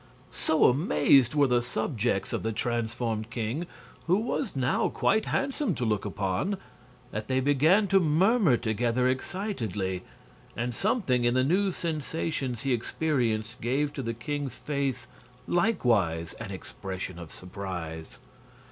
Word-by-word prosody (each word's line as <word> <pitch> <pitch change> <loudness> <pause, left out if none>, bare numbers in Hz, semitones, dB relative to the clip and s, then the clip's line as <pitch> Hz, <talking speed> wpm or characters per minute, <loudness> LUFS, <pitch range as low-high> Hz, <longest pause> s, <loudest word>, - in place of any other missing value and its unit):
So 160 - +2
amazed 135 - +4
were 145 -1 +5
the 125 -2 +3
subjects 120 -4 -1
of - - -1
the 110 - -1
transformed 115 -1 -2
king 125 +8 -3 0.4
who 180 +3 +4
was 220 -3 -2
now 130 -1 +1
quite 220 0 +2
handsome 275 +1 0
to 125 - -2
look 105 -2 0
upon 100 - -1 0.5
that 110 0 -4
they 130 0 +1
began 145 +9 +4
to 195 0 +6
murmur 180 - +4
together 120 +2 +1
excitedly, 120 - -2 0.6
and 120 +1 -1
something 185 - +1
in 120 +1 +2
the 130 - +4
new 190 +7 +2
sensations 155 -6 -3
he 135 -2 +1
experienced 115 -4 -1
gave 140 +5 0
to 140 - -4
the 115 -2 -3
king's 140 +1 -4
face 135 -4 -2 0.4
likewise 115 - +1
an 110 -3 -6
expression 95 -1 -6
of 85 -2 -9
surprise. 90 -4 -6
125 Hz, 135 wpm, -28 LUFS, 110-155 Hz, 0.6 s, to